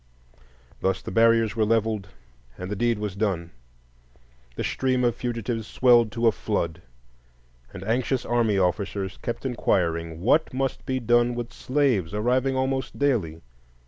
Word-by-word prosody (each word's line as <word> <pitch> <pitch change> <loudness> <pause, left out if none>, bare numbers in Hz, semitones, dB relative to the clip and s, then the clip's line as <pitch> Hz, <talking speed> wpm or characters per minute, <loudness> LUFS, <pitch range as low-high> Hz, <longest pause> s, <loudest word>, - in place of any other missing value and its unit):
Thus 95 0 -1
the - - -6
barriers 115 -1 +3
were 110 - +2
levelled 110 -2 0 0.5
and 90 +2 -6
the - - -1
deed 120 +2 +1
was 105 -3 -4
done. 95 -5 -1 1.0
The - - -3
stream 130 -1 0
of 120 -1 +3
fugitives 115 -2 -3
swelled 120 -1 +4
to 120 0 -1
a 115 - +6
flood, 85 -7 -2 0.9
and 95 - -8
anxious 125 +4 0
army 115 -4 +1
officers 95 +1 -1
kept 120 - -4
inquiring: 85 -9 0
"What 130 - +2
must 135 0 -2
be 130 0 0
done 120 0 +2
with 120 -1 -5
slaves, 125 - 0
arriving 125 +5 +1
almost 130 0 -1
daily? 105 - 0
115 Hz, 145 wpm, -25 LUFS, 100-125 Hz, 1.0 s, a